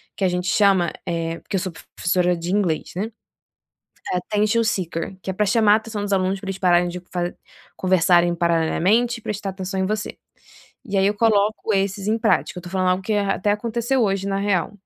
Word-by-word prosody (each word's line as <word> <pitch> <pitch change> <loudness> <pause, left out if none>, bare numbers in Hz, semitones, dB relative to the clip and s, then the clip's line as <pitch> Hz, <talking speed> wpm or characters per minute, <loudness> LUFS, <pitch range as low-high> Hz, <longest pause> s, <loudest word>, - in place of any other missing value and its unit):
que - - -4
a - - +4
gente 180 0 -2
chama, 190 -3 +3
é 165 -1 -2
porque - - -6
eu - - +1
sou 185 0 -4 0.2
professora 180 0 +1
de 170 +1 -4
inglês, 190 -6 0
né, 210 +5 -3 1.0
attention 210 +5 +1
seeker, 185 -4 -2
que - - -10
é - - -1
para 210 +3 0
chamar 215 0 +4
a - - +6
atenção 220 -1 -5
dos 205 0 -3
alunos 190 0 +1
para 200 - -9
eles 195 0 -4
pararem 175 -1 +3
de 180 +1 -6
fa 175 -1 -2 0.4
conversarem 175 -1 +3
paralelamente 175 +8 +2
e - - -15
prestar 205 -2 -3
atenção 190 0 -5
em 190 - +1
você. 210 +1 -3 0.7
E 205 -5 -3
aí 190 - +3
eu 205 - +2
coloco 215 0 +2
esses 195 0 -1
em 220 +2 +1
prática. 215 - +1
Eu - - -6
estou 175 0 -10
falando 185 -1 +1
algo 185 +1 0
que 215 +3 -1
até 205 0 0
aconteceu 235 +4 0
hoje 195 -2 0
na 195 - -1
real. 195 -4 0
195 Hz, 205 wpm, -22 LUFS, 180-210 Hz, 1.0 s, a